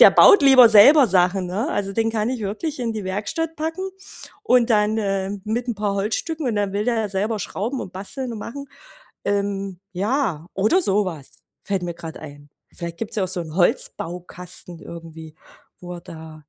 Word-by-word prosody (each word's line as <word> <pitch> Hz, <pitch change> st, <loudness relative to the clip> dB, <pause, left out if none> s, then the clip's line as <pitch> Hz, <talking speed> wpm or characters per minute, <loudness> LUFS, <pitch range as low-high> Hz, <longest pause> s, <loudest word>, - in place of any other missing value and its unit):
Der -, -, +10 dB
baut 400 Hz, -, +7 dB
lieber 260 Hz, -4 st, +8 dB
selber 250 Hz, +6 st, +8 dB
Sachen, 185 Hz, 0 st, +2 dB
ne? 210 Hz, -, -2 dB
Also, 195 Hz, -, -2 dB
den 225 Hz, +2 st, +1 dB
kann 220 Hz, 0 st, -1 dB
ich 255 Hz, -3 st, -3 dB
wirklich 260 Hz, +10 st, -4 dB
in 230 Hz, -2 st, -1 dB
die 215 Hz, -3 st, -5 dB
Werkstatt 220 Hz, -, -3 dB
packen 325 Hz, +5 st, -3 dB, 0.5 s
und 250 Hz, -, +3 dB
dann 215 Hz, 0 st, +3 dB
äh, 195 Hz, -2 st, -1 dB
mit 235 Hz, +3 st, -2 dB
'n 235 Hz, -, -1 dB
paar 205 Hz, -1 st, -1 dB
Holzstücken 255 Hz, +10 st, -2 dB
und 225 Hz, -3 st, -1 dB
dann 205 Hz, -1 st, 0 dB
will 205 Hz, +1 st, -1 dB
der 225 Hz, -3 st, 0 dB
selber 210 Hz, +3 st, -1 dB
schrauben 230 Hz, +7 st, -3 dB
und 185 Hz, -, -7 dB
basteln 235 Hz, +7 st, -5 dB
und 220 Hz, -, -6 dB
machen 280 Hz, +6 st, -7 dB, 0.6 s
ähm, 200 Hz, -2 st, -2 dB
ja, 195 Hz, -, -1 dB
oder 215 Hz, -, +3 dB
so 205 Hz, -3 st, +2 dB
was, 160 Hz, -7 st, -7 dB, 0.3 s
fällt 195 Hz, -3 st, -1 dB
mir 175 Hz, -1 st, -4 dB
grad 165 Hz, -1 st, -9 dB
ein. 145 Hz, -1 st, -11 dB, 0.3 s
Vielleicht 170 Hz, -1 st, -6 dB
gibt's 225 Hz, -1 st, -4 dB
ja 195 Hz, -, +1 dB
auch -, -, -4 dB
so 185 Hz, -1 st, -2 dB
'n 160 Hz, 0 st, -7 dB
Holzbaukasten 175 Hz, -1 st, -2 dB
irgendwie, 160 Hz, -2 st, -10 dB, 0.4 s
wo 180 Hz, 0 st, -7 dB
er 175 Hz, -, -8 dB
da 160 Hz, -1 st, -11 dB
205 Hz, 190 wpm, -22 LUFS, 180-235 Hz, 0.6 s, Der